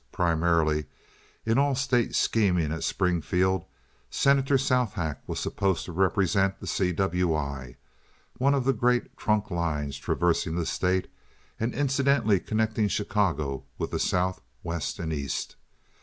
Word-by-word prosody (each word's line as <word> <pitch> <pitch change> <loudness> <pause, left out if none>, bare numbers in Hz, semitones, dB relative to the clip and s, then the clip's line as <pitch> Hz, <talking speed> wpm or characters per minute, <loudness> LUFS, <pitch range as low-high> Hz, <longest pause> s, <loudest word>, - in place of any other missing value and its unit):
Primarily, 85 -3 +1 0.6
in 115 +3 +2
all 140 -1 +2
state 125 -3 +1
scheming 90 -8 +2
at 80 - -4
Springfield, 90 0 +1 0.4
Senator 140 0 +3
Southack 110 - 0
was - - -3
supposed 95 -3 -1
to - - -7
represent 95 +2 +1
the - - -8
C. 90 -2 0
W. 90 -2 +1
I., 70 -4 -4 0.6
one 140 +2 +3
of 135 -3 0
the 135 - +3
great 120 +1 +1
trunk 105 -1 0
lines 75 -5 -2
traversing 85 -2 0
the 85 -1 -1
state, 90 +2 0 0.5
and 115 +2 0
incidentally 135 -7 +2
connecting 110 +1 0
Chicago 85 -11 -1
with - - -3
the - - -1
South, 95 +1 0 0.2
West, 85 -3 -3
and 80 -1 -3
East. 70 -4 -3
95 Hz, 135 wpm, -27 LUFS, 80-115 Hz, 0.6 s, Senator